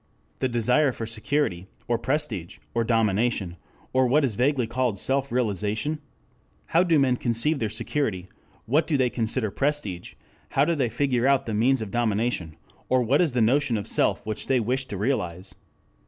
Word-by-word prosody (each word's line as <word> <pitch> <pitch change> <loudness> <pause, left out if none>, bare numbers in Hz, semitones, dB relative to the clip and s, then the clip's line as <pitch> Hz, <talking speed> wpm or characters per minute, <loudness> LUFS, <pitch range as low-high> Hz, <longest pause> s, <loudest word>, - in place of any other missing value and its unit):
The 130 - 0
desire 125 +5 +3
for 115 - -5
security, 110 -4 -1 0.2
or 120 -1 +1
prestige, 130 - -2 0.2
or 115 - +1
domination, 110 -4 +1 0.4
or 130 0 +4
what 140 +4 +3
is 125 - -1
vaguely 125 +2 +1
called 120 -2 -1
self 135 +5 0
realization? 110 - -1 0.7
How 165 - +6
do 170 -3 +3
men 130 -3 +3
conceive 120 +7 0
their 110 - -1
security, 110 -4 -2 0.4
what 145 +8 +2
do 155 -3 +2
they 125 -2 +2
consider 110 -1 -1
prestige, 135 -12 -2 0.4
how 140 - +5
do 170 - +1
they 135 -7 0
figure 125 +1 +1
out 140 -1 +3
the 110 - -3
means 120 +3 +2
of 100 - -8
domination, 110 -7 -1 0.3
or 130 -1 +3
what 135 +7 +3
is 160 -7 +1
the 125 - +1
notion 125 +1 +2
of 100 - -4
self - - 0
which 110 -1 -4
they 130 -2 +3
wish 130 +3 -1
to 100 - -5
realize? 95 -5 -2
120 Hz, 175 wpm, -25 LUFS, 110-135 Hz, 0.7 s, How